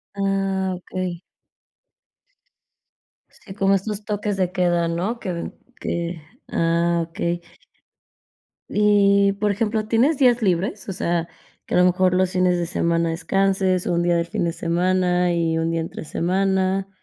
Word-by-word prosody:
Ah, 195 -1 0
okey. 180 -1 -5 2.1
Sí, 190 - -13
como 195 -1 +2
estos 205 +2 -4
toques 205 -1 -2
de 185 -1 0
queda, 175 -2 +1
¿no? 185 +8 -2
Que 185 -4 -4
den 170 - -5 0.3
que 170 -1 -3 0.3
ah, 170 0 +1
okey. 170 +1 -2 1.3
Y, 200 -1 +4
por 205 +1 0
ejemplo, 215 +1 -1
¿tienes 255 +7 +3
días 245 -3 +4
libres? 195 +1 -1
O 195 - -3
sea, 170 -2 -1 0.4
que - - -3
a - - +4
lo 180 - +6
mejor 180 0 +3
los 185 0 +2
fines 180 -1 +2
de 175 - -1
semana 170 -1 0
descanses, 190 +1 +1
un 175 0 +1
día 175 0 +2
del 170 0 +1
fin 170 - -2
de 170 - -1
semana 180 +1 +1
y 165 -1 0
un 165 0 0
día 165 0 -1
entre 160 - -7
semana. 190 +3 0
185 Hz, 150 wpm, -22 LUFS, 170-195 Hz, 2.1 s, lo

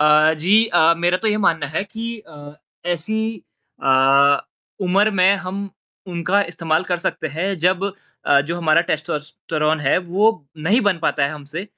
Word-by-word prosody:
अ, 155 +1 +5
जी, 205 +8 +4
अ, 170 -4 +4
मेरा 175 +1 +2
तो - - +3
ये 210 - +1
मानना 160 -2 +1
है 190 - 0
कि 225 +3 -8 0.2
अ, 145 -1 -12 0.4
ऐसी 180 +7 -3 0.6
अ, - - -3 0.9
उम्र 195 +3 +2
में 190 0 +4
हम 200 +2 -5 0.4
उनका 180 +3 0
इस्तेमाल 165 0 -1
कर 175 - +1
सकते 170 -2 -3
हैं 180 +4 -1
जब 180 +3 +1 0.4
अ, 140 -1 +5
जो 170 - -2
हमारा 165 -1 +3
टेस्टोस्टेरोन 155 +1 -2
है 135 -2 +2
वो 205 +5 +3 0.4
नहीं 220 +8 +3
बन 185 -4 0
पाता 145 -3 +1
है 140 - -1
हमसे। 155 +4 -7
170 Hz, 165 wpm, -20 LUFS, 155-190 Hz, 0.9 s, अ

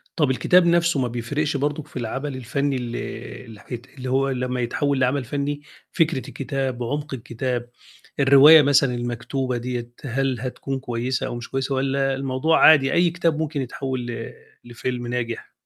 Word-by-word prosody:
طَب 150 -4 +2
الكتاب 170 +8 +4
نَفْسه 170 -3 +3
ما 125 - +1
بيفرقش 140 +5 -2
برضُك 145 +1 -2
في - - -9
العمل 135 +4 -4
الفنّي 140 +3 -1
ال 120 -2 -4 0.5
اللي 110 -3 -12
حيت 120 +4 -8
اللي 130 0 -5
هو 135 +1 +2
لمّا 125 -1 -2
يتحوّل 140 +3 0
لعمل 130 +2 +1
فنّي 145 +3 -3 0.3
فكرة 165 -6 0
الكتاب، 135 -2 -3
عُمق 145 +4 -3
الكتاب، 120 0 -3 0.5
الرواية 140 +3 +8
مثلًا 140 -3 +3
المكتوبة 120 +2 -3
دِيّة، 120 0 -4
هل 135 -1 -1
هتكون 135 +2 -4
كويسة 125 +1 -2
أو 120 - -5
مش 120 - -7
كويسة 135 +1 -1
والّا 135 0 0
الموضوع 135 +4 +1
عادي 140 -4 +6
أي 175 0 +4
كتاب 165 -2 0
ممكن 155 -2 -2
يتحوّل 130 0 -4
ل 120 -1 -6 0.3
لفيلم 120 0 -4
ناجح؟ 120 -1 -4
130 Hz, 160 wpm, -23 LUFS, 125-145 Hz, 0.5 s, الرواية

